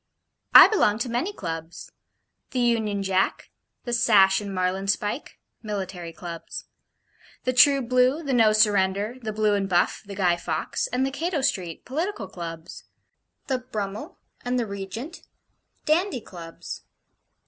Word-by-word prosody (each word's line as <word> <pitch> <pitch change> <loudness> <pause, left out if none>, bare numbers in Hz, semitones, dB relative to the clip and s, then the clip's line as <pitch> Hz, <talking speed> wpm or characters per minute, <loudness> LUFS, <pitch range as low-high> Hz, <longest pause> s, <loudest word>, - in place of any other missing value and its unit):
I - - +12
belong 215 - +2
to - - -6
many 245 - -1
Clubs. 165 - -7 0.6
The 255 - -2
'Union 220 -4 +1
Jack,' 190 0 0 0.3
the 240 - -4
'Sash 200 -4 +5
and 200 -1 -6
Marlin 185 +1 -1
spike' 205 +6 -2 0.2
Military 190 -5 -5
Clubs. 170 0 -8 0.8
'The 255 - 0
True 275 +2 +6
Blue,' 255 +5 +2
the 280 -3 -2
'No 225 -3 +5
Surrender,' 205 +1 +2
the 220 -2 -3
'Blue 215 0 +1
and 195 -1 0
Buff,' 175 -1 +1
the 200 -1 -9
'Guy 180 -3 +2
Fawkes,' 480 - -2
and 265 - 0
the 270 - -2
'Cato 325 +2 -2
Street' 185 -11 -2
Political 290 - -3
Clubs. 165 -1 -8 0.6
'The 260 -2 -1
Brummel' 220 - -6 0.3
and 245 +1 -1
the 240 - 0
'Regent' 210 - -7 0.6
Dandy 320 - +1
Clubs. 170 -5 -9
210 Hz, 140 wpm, -25 LUFS, 190-255 Hz, 0.8 s, I